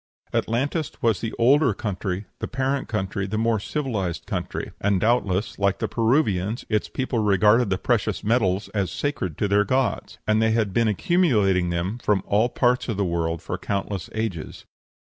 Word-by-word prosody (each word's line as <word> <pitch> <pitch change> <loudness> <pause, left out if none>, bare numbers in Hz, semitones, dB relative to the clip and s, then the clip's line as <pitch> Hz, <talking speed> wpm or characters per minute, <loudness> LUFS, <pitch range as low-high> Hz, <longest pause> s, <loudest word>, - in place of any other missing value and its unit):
Atlantis 140 +7 0
was 115 -4 +2
the 115 - -2
older 130 -1 +4
country, 100 -2 -3
the - - -3
parent 135 0 -1
country, 100 -2 -2
the 105 +2 -2
more 115 0 +1
civilized 105 - -3
country; - - -4
and, 100 -1 +2
doubtless, 105 -4 0
like 100 -1 +2
the - - -2
Peruvians, 110 - +1
its 105 -1 0
people 130 -2 -2
regarded 105 +2 +4
the 95 - +1
precious 115 +2 0
metals 105 -4 +1
as 100 -3 -1
sacred 95 - -3
to 105 - +1
their 100 +1 +3
gods; 130 +5 -1
and 110 0 +2
they 110 0 +3
had 110 -4 0
been 115 +1 +3
accumulating 105 - +2
them 90 +7 -2
from 100 -4 +1
all 110 +4 +2
parts 125 0 +1
of 110 - -2
the 100 - +1
world 85 -2 -1
for - - -4
countless 100 -1 -3
ages. 110 -8 -4
105 Hz, 170 wpm, -24 LUFS, 95-120 Hz, -, older